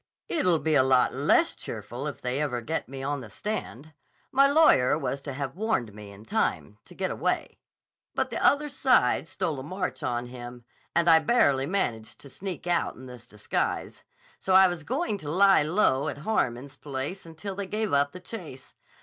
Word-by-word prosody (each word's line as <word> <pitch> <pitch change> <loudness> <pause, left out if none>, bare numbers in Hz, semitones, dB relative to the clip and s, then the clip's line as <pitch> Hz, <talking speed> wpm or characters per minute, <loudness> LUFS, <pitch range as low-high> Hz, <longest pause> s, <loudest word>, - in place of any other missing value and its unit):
"It'll 180 - +2
be 160 0 -1
a 145 - +6
lot 130 -1 +3
less - - +3
cheerful - - -6
if - - -6
they 125 +3 -1
ever 130 -5 -1
get 155 +1 -3
me 135 0 -7
on 145 +1 -2
the 115 -4 -10
stand. 155 - -5 0.4
My 275 +1 +5
lawyer 280 - +5
was 135 -2 -3
to 140 -1 -6
have 135 +1 -4
warned 190 - -1
me 105 -1 -10
in 100 +2 -14
time 220 - -1
to - - -15
get - - -2
away, - - -2 0.6
but - - -1
the - - -3
other 295 +1 +4
side 255 - +2
stole 145 -1 -2
a - - -6
march 185 +7 -4
on 120 0 -2
him, 120 -1 -10 0.3
and 170 0 +2
I 165 -1 +8
barely 145 - +2
managed 120 - -2
to 140 - -11
sneak 190 +1 -6
out 175 -1 0
in 130 - -12
this 125 -2 -11
disguise. 105 -3 -3 0.4
So 190 - +1
I 190 0 +8
was 175 -3 -4
going 255 - -2
to 150 -4 -6
lie 195 +3 +5
low 155 -3 +2
at - - -4
Harmon's 135 - -1
place 145 +7 -5
until 165 +5 -7
they 195 0 -5
gave 215 -1 -2
up 140 0 +3
the 185 - -9
chase. 175 - -9
150 Hz, 190 wpm, -27 LUFS, 130-190 Hz, 0.6 s, I